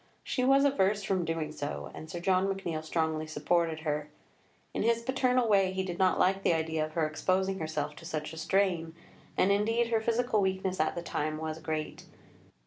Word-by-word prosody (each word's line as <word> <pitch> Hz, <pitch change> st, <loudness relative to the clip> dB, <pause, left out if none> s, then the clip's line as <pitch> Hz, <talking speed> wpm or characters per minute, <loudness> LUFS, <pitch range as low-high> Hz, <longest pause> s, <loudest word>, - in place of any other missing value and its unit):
She 255 Hz, -, -1 dB
was 275 Hz, +2 st, +5 dB
averse 205 Hz, -7 st, +2 dB
from 190 Hz, -3 st, 0 dB
doing 165 Hz, -1 st, -2 dB
so, 145 Hz, -1 st, -5 dB
and 155 Hz, -, -9 dB
Sir 175 Hz, -, -5 dB
John 185 Hz, +1 st, +2 dB
McNeill 185 Hz, -5 st, -3 dB
strongly 160 Hz, -1 st, -1 dB
supported 160 Hz, +1 st, 0 dB
her. 150 Hz, -1 st, -2 dB, 0.6 s
In -, -, -1 dB
his 230 Hz, 0 st, +2 dB
paternal 255 Hz, -1 st, +2 dB
way 195 Hz, -3 st, +4 dB
he 190 Hz, 0 st, -1 dB
did 180 Hz, -2 st, -5 dB
not 185 Hz, -1 st, +3 dB
like 195 Hz, +1 st, +3 dB
the 175 Hz, -, +3 dB
idea 160 Hz, -1 st, -1 dB
of 155 Hz, 0 st, -5 dB
her 165 Hz, -1 st, +1 dB
exposing 190 Hz, +5 st, 0 dB
herself 155 Hz, -2 st, -3 dB
to -, -, -11 dB
such 155 Hz, 0 st, -4 dB
a -, -, -9 dB
strain, 170 Hz, -2 st, +1 dB, 0.4 s
and 190 Hz, -, +4 dB
indeed 225 Hz, +4 st, +2 dB
her 225 Hz, -1 st, +2 dB
physical 230 Hz, -1 st, +1 dB
weakness 190 Hz, -1 st, -1 dB
at 155 Hz, -, +1 dB
the 170 Hz, -, -4 dB
time 155 Hz, -2 st, -2 dB
was 155 Hz, 0 st, -4 dB
great. 155 Hz, -1 st, -4 dB
180 Hz, 195 wpm, -30 LUFS, 155-200 Hz, 0.6 s, was